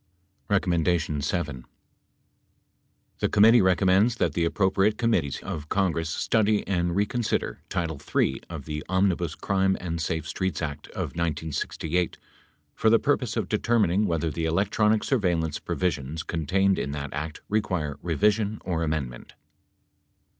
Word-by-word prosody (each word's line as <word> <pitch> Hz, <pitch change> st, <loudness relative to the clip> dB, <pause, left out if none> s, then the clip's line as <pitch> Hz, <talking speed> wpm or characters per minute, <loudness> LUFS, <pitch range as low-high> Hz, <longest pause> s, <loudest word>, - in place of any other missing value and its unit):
7. 85 Hz, -6 st, 0 dB, 1.6 s
The -, -, +1 dB
committee 115 Hz, +3 st, +6 dB
recommends 95 Hz, +4 st, +3 dB
that 85 Hz, -9 st, 0 dB
the 85 Hz, +1 st, +1 dB
appropriate 95 Hz, +4 st, +2 dB
committees 115 Hz, -, +1 dB
of 75 Hz, 0 st, -5 dB
Congress 85 Hz, -5 st, 0 dB
study 105 Hz, +5 st, +1 dB
and 85 Hz, -2 st, 0 dB
reconsider 105 Hz, +4 st, -1 dB
title 80 Hz, -5 st, -2 dB
III 65 Hz, -, +2 dB
of 80 Hz, -5 st, -7 dB
the 75 Hz, -1 st, -4 dB
Omnibus 95 Hz, -4 st, +1 dB
Crime 95 Hz, -1 st, +1 dB
and 85 Hz, -2 st, -3 dB
Safe 80 Hz, -1 st, -2 dB
Streets 95 Hz, +1 st, -2 dB
Act 70 Hz, -2 st, -5 dB
of -, -, -4 dB
1968 80 Hz, +1 st, -2 dB, 0.6 s
for 110 Hz, -, +2 dB
the 115 Hz, -, +6 dB
purpose 125 Hz, -4 st, 0 dB
of -, -, -1 dB
determining 105 Hz, -3 st, +2 dB
whether 80 Hz, -1 st, 0 dB
the 80 Hz, +3 st, -2 dB
electronic 105 Hz, +5 st, +2 dB
surveillance 85 Hz, -, 0 dB
provisions 80 Hz, -3 st, -2 dB
contained 95 Hz, +5 st, +1 dB
in 70 Hz, -, -3 dB
that 70 Hz, -1 st, -5 dB
act 75 Hz, +2 st, -5 dB
require 90 Hz, -9 st, -1 dB
revision 105 Hz, +5 st, +1 dB
or 85 Hz, -3 st, -1 dB
amendment. 75 Hz, -7 st, -3 dB
85 Hz, 125 wpm, -26 LUFS, 80-100 Hz, 1.6 s, committee